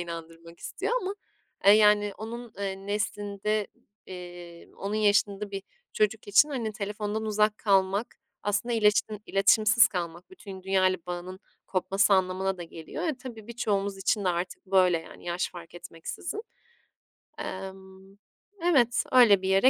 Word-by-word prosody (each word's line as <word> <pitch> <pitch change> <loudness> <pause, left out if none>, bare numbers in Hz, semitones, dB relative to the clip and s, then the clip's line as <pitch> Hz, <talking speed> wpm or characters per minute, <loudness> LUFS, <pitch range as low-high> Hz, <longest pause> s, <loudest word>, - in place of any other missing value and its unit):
inandırmak 165 0 -8
istiyor - - -3
ama, 380 +2 -3 0.5
eee, 200 - +9
yani, 210 -1 +5
onun, 235 +2 -7
eee, 195 0 -4
neslinde, 205 0 -1 0.4
eee, 175 -2 -10
onun 200 +2 -4
yaşında 205 -1 +2
bir 195 -1 -5 0.3
çocuk 215 0 0
için, 275 +9 +6
hani, 235 -6 -3
telefondan 210 +2 -3
uzak 215 0 +1
kalmak, 195 +1 +1 0.3
aslında 205 +4 -1
iletişim 210 0 +2
iletişimsiz 215 +4 +5
kalmak, 175 -2 -5
bütün 195 - -10
dünyayla 185 -1 +2
bağının 180 +1 -6 0.3
kopması 195 +2 +2
anlamına 190 0 0
da - - -5
geliyor. 165 - -8
Eee, 315 -5 -1
tabii, 225 -4 -9
birçoğumuz 200 -4 -1
için 200 +1 0
de - - +2
artık 175 +3 -3
böyle, 185 -3 +4
yani, 165 - -13
yaş 175 +1 -2
fark 175 -1 -11
etmeksizin. 175 - -6 1.0
Emm, 190 +1 -8 0.4
evet, 265 -9 +3
öyle 230 -7 +7
bir 190 - -2
yere 195 +7 +6
200 Hz, 135 wpm, -28 LUFS, 185-215 Hz, 1.0 s, eee